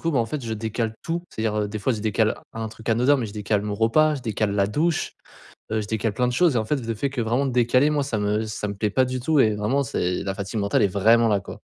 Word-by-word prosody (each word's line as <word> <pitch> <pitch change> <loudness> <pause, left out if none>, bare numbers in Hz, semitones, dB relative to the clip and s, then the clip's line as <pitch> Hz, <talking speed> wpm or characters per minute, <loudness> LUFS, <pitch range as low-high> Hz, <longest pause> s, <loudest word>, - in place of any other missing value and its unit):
coup, 165 - 0
ben, 140 - +1
en 115 - +1
fait 135 +2 -5
je 115 - -3
décale 110 +1 -2
tout, 170 +1 -2
c'est-à-dire, 110 -1 -2
heu, 105 - -2
des 105 +1 -5
fois 125 +5 0
je 110 - -4
décale 105 -2 0
un 110 0 -4
truc 110 +1 -11
anodin 125 +5 +4
mais 125 -4 -2
je 100 - -9
décale 105 -1 -1
mon 105 -1 -3
repas, 150 +8 +3
je 135 - -7
décale 110 -2 -1
la 100 -1 +2
douche, 155 +10 0 0.6
heu, 110 - +1
je 105 - -6
décale 110 +1 -1
plein 125 +3 +1
de 125 - -1
choses 160 +1 +3
et - - +3
en 110 - -2
fait 145 - 0
le 115 -3 -4
fait 140 +6 -2
que 135 -3 -2
vraiment 120 +5 0
décaler 125 +3 +3
moi 150 -1 +1
ça 120 -6 -2
me 105 +2 0
ça 105 -1 -4
me 100 - -3
plaît 105 +1 -1
pas 130 +4 +3
du 130 0 -3
tout 150 +4 +1
et 110 -5 +4
vraiment 110 +7 0
c'est 90 -7 -2
la 95 0 -2
fatigue 100 +2 -4
mentale 100 0 +1
est - - +5
vraiment 110 +5 +4
là, 105 -2 +2
quoi. - - -10
115 Hz, 295 wpm, -24 LUFS, 105-130 Hz, 0.6 s, est